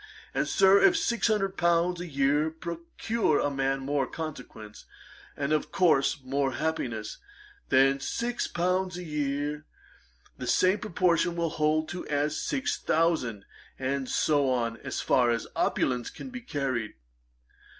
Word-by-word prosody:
And, - - 0
Sir, 195 0 +5
if 370 -3 +6
six 235 -10 +1
hundred 195 -3 0
pounds 170 +1 +2
a 175 - -5
year 145 +1 +2
procure 170 +3 -2
a 145 - 0
man 135 0 0
more 140 -1 0
consequence, 125 -10 -8 0.5
and, 140 +1 0
of 155 - -1
course, 145 -6 +2
more 135 0 -1
happiness 120 -8 -3 0.5
than 135 +1 +4
six 240 - -2
pounds 180 +1 -1
a 180 - -6
year, 150 -1 -3 0.7
the - - -5
same 185 +3 +3
proportion 175 -4 +1
will 170 -2 -1
hold 155 0 0 0.2
as 145 +1 0
to - - -3
six 280 +1 -1
thousand, 155 -11 0 0.3
and 135 0 -2
so 145 -3 +2
on 115 -2 0
as - - -4
far 125 -2 +3
as 115 -1 0
opulence 125 -2 0
can 265 - -9
be 250 0 -7
carried. 135 - -3
150 Hz, 140 wpm, -28 LUFS, 135-180 Hz, 0.7 s, if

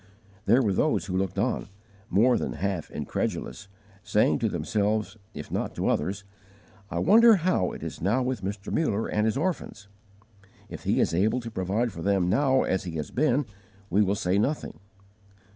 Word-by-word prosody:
There 130 +2 +5
were 100 -4 +1
those 150 +2 +1
who 90 -2 -4
looked 95 0 -1
on, - - -1 0.4
more 120 +5 +4
than - - -2
half 95 -4 -3
incredulous, 65 +11 -4 0.3
saying 105 +4 +2
to 115 -3 +1
themselves 105 0 -1 0.2
if - - -8
not - - -2
to - - 0
others, 95 +5 -1 0.7
"I - - -4
wonder 225 +4 +6
how 175 - +1
it - - -8
is - - -6
now 110 +9 +1
with 125 -4 -2
Mr. 100 +1 -5
Muller 110 -9 0
and 105 +1 +1
his 110 - 0
orphans! 155 - -3 0.8
If - - -9
he - - +2
is - - +2
able 105 +8 +2
to 115 -1 -7
provide 105 +5 -1
for 85 - -8
them 95 -1 +1
now 135 +3 +3
as 95 - -1
he 85 - -5
has 75 -2 -4
been, 140 0 +1 0.5
we 100 +4 +4
will 100 -1 +2
say 100 -2 +1
nothing." 140 +8 -2
105 Hz, 175 wpm, -26 LUFS, 95-125 Hz, 0.8 s, wonder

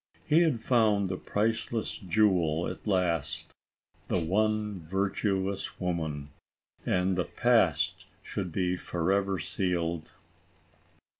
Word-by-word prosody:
He 160 +2 +5
had 155 -9 +2
found 105 -6 +3
the 95 - -1
priceless 110 +3 -1
jewel 90 -5 +2
at - - -7
last, 90 -6 0 0.5
"the - - +1
one 105 +3 0
virtuous 95 +2 -1
woman," 80 -5 -3 0.6
and 90 +1 +2
the 90 -2 0
past - - +2 0.2
should 95 -3 -4
be 90 +1 0
forever 95 +3 0
sealed. 85 -1 -2
95 Hz, 100 wpm, -29 LUFS, 85-105 Hz, 0.6 s, He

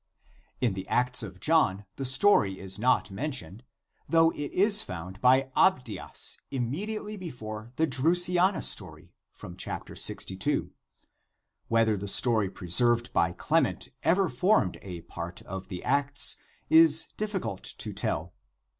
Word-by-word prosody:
In 120 -5 +1
the 95 0 -6
Acts 125 +1 +2
of 95 -4 -8
John 105 - +2
the 135 - -3
story 130 - +3
is 95 +1 -7
not 125 -3 +2
mentioned 105 - -5 0.5
though 165 0 +4
it 145 -3 -6
is 205 +2 +4
found 90 +2 -8
by 130 +1 +4
Abdias 125 - 0
immediately 205 - -4
before 115 - -8
the 160 - +2
Drusiana 175 +6 +2
story - - -1 0.2
(c. 90 +1 -7
62). 95 0 -2 1.0
Whether 115 -2 +2
the 100 +1 -5
story 110 -1 +3
preserved 120 +7 0
by 85 - +2
Clement - - 0
ever 185 +3 +2
formed 150 - +1
a 90 -3 -8
part 85 +1 -8
of 95 0 -7
the 90 -3 -7
Acts, 140 0 +1 0.3
is 160 0 +5
difficult 205 - -4
to - - -4
tell. - - -3
125 Hz, 130 wpm, -28 LUFS, -, 1.0 s, is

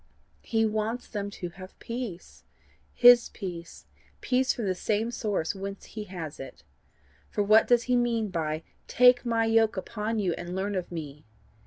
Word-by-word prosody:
He 225 -1 +1
wants 220 +3 -2
them 205 -2 -4
to 180 -3 -6
have 185 +2 -12
peace 230 -7 -7 0.5
HIS 245 -1 +7
peace 175 -4 -8 0.3
peace 260 +1 +1
from 230 - -3
the 190 - +1
same 215 +5 -1
source 205 -8 -2
whence 195 0 -7
he 215 -1 -7
has 170 -6 -7
it. 135 - -10 0.7
For 205 - 0
what 215 +2 +5
does 240 -1 +4
he 250 +1 +1
mean 235 -3 +1
by 160 -2 -2 0.2
TAKE 250 0 +5
MY 230 -1 +2
YOKE 225 -1 +3
UPON 215 +3 -3
YOU, 190 -5 0
AND 175 +1 -6
LEARN 195 +2 -2
OF 185 -2 -3
ME? 150 -6 -7
210 Hz, 165 wpm, -27 LUFS, 180-230 Hz, 0.7 s, HIS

